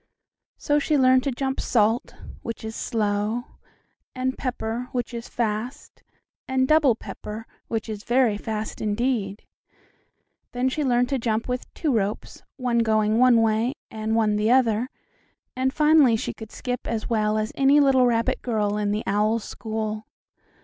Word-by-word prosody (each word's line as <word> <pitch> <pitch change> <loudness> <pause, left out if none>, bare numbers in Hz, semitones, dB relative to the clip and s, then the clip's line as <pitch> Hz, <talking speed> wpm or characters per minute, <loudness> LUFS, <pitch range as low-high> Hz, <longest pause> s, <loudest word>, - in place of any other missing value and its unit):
So 290 0 +1
she 295 +1 +1
learned 260 -1 +5
to 275 - +1
jump 265 +1 -2
"salt," 225 +2 +1 0.3
which 230 -1 -6
is 220 0 -5
slow, 210 +1 -1 0.7
and 260 0 -1
"pepper," 245 -2 -3
which 245 -1 -3
is 235 0 -6
fast, 235 +5 -4 0.5
and 260 0 +1
"double 305 -5 +4
pepper," 220 0 -8 0.2
which 225 0 -3
is 215 -2 -6
very 240 -3 +2
fast 215 0 -5
indeed. 215 -2 -1 1.1
Then 250 +1 +1
she 300 +3 -2
learned 245 -2 +2
to 270 - 0
jump 225 -1 -1
with 250 0 -4
two 300 -5 0
ropes, 205 -1 -2 0.2
one 245 -3 0
going 220 -1 +2
one 245 -2 +5
way 225 +4 +1 0.2
and 220 0 -2
one 215 -2 +2
the 210 +1 +1
other, 245 -1 +3 0.7
and 260 +1 +1
finally 300 -5 +5
she 220 - -3
could 220 -1 -10
skip 250 -1 -4
as 225 -2 -2
well 215 -2 +1
as 215 0 -1
any 275 +2 +4
little 265 -3 +5
rabbit 230 -1 0
girl 210 -4 0
in 210 -1 0
the 210 +2 -1
owl's 210 +2 +1
school. 215 -1 -4
230 Hz, 155 wpm, -24 LUFS, 215-255 Hz, 1.1 s, learned